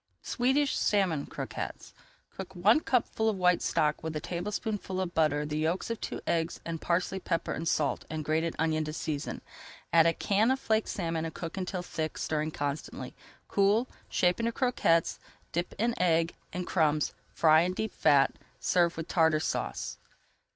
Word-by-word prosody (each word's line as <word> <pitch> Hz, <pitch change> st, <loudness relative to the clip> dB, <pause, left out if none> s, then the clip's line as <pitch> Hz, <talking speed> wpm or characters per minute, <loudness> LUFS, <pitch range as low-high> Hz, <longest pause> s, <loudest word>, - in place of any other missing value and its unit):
SWEDISH 265 Hz, +3 st, +1 dB
SALMON 185 Hz, -8 st, +1 dB
CROQUETTES -, -, -6 dB, 0.4 s
Cook 190 Hz, 0 st, -7 dB
one 205 Hz, +10 st, +5 dB
cupful 230 Hz, -5 st, +1 dB
of 210 Hz, -, -1 dB
white 180 Hz, -1 st, +3 dB
stock 150 Hz, 0 st, +1 dB
with 160 Hz, -1 st, -4 dB
a -, -, 0 dB
tablespoonful 190 Hz, +3 st, -3 dB
of 180 Hz, -2 st, -2 dB
butter, 150 Hz, -2 st, +2 dB
the 150 Hz, +1 st, -2 dB
yolks 165 Hz, +8 st, 0 dB
of 230 Hz, -, -4 dB
two -, -, -4 dB
eggs, 165 Hz, 0 st, 0 dB
and 165 Hz, -2 st, -4 dB
parsley, 180 Hz, +2 st, 0 dB
pepper 165 Hz, -2 st, -1 dB
and 165 Hz, -, -4 dB
salt, 150 Hz, -3 st, +1 dB
and 155 Hz, -1 st, -4 dB
grated 160 Hz, +2 st, 0 dB
onion 155 Hz, -1 st, +1 dB
to 155 Hz, -, -4 dB
season. 150 Hz, -2 st, -3 dB, 0.5 s
Add 165 Hz, -1 st, +7 dB
a 165 Hz, -, +3 dB
can 210 Hz, +6 st, +2 dB
of 265 Hz, +1 st, +2 dB
flaked 220 Hz, -2 st, +1 dB
salmon 165 Hz, -3 st, -2 dB
and 165 Hz, -, -5 dB
cook 165 Hz, -1 st, -5 dB
until 185 Hz, -1 st, -3 dB
thick, 160 Hz, -3 st, -4 dB
stirring 155 Hz, 0 st, -1 dB
constantly. 155 Hz, -, -4 dB, 0.3 s
Cool, 205 Hz, +5 st, +3 dB, 0.2 s
shape 180 Hz, +2 st, +2 dB
into 230 Hz, 0 st, +1 dB
croquettes, 225 Hz, -, +2 dB, 0.3 s
dip 175 Hz, +2 st, -2 dB
in 230 Hz, +3 st, +1 dB
egg 165 Hz, -2 st, +3 dB, 0.2 s
and 180 Hz, 0 st, -3 dB
crumbs, 155 Hz, -4 st, +2 dB, 0.2 s
and -, -, -31 dB
fry 160 Hz, -1 st, +6 dB
in 180 Hz, +2 st, 0 dB
deep 220 Hz, 0 st, -2 dB
fat. 140 Hz, -1 st, +4 dB, 0.3 s
Serve 175 Hz, -2 st, +2 dB
with 160 Hz, -, -4 dB
Tartar 160 Hz, -3 st, +3 dB
Sauce. 65 Hz, -, -3 dB
170 Hz, 170 wpm, -30 LUFS, 155-200 Hz, 0.5 s, Add